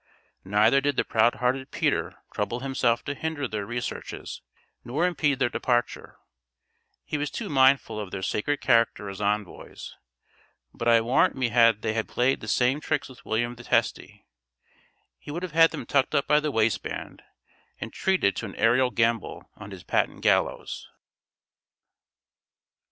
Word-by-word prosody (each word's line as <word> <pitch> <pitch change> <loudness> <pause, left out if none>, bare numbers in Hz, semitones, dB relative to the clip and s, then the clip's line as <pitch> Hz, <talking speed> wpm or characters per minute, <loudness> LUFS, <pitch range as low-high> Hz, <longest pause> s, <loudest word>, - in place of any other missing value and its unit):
Neither 105 +8 +3
did 145 0 0
the - - +1
proud 115 +2 +2
hearted 130 +2 -1
Peter - - -1 0.2
trouble 105 +4 -2
himself 130 -3 0
to 145 - -2
hinder 145 -1 -3
their 105 -3 -4
researches 120 +1 -5 0.4
nor 140 +9 -1
impede 150 -6 +1
their 130 -2 +2
departure; 120 -1 -2 0.9
he 150 - -3
was 145 0 -2
too 220 -4 -5
mindful 130 -5 +3
of 105 -3 -5
their 95 0 -6
sacred 145 +10 -1
character 115 -4 +2
as 95 +1 -8
envoys; 105 -1 -4 0.8
but 115 - -4
I 115 -1 +6
warrant 120 +4 +2
me 130 -2 0
had 115 -2 +4
they 110 0 0
played 125 +4 0
the - - -8
same 130 +4 +1
tricks - - -2
with 130 - -15
William 120 +2 0
the 120 0 -12
Testy, - - -1 0.9
he - - -13
would 170 +5 -4
have 185 - -4
had 165 +1 +6
them - - -7
tucked 140 -2 +1
up 140 - +2
by 150 - +4
the 150 0 -2
waistband, 110 -5 -2 0.6
and - - -6
treated 185 - +1
to 115 - -4
an 95 - -10
aerial 125 +3 +3
gambol 115 -3 -1
on - - -10
his - - -10
patent - - -1
gallows. - - 0
120 Hz, 155 wpm, -26 LUFS, 115-140 Hz, 0.9 s, I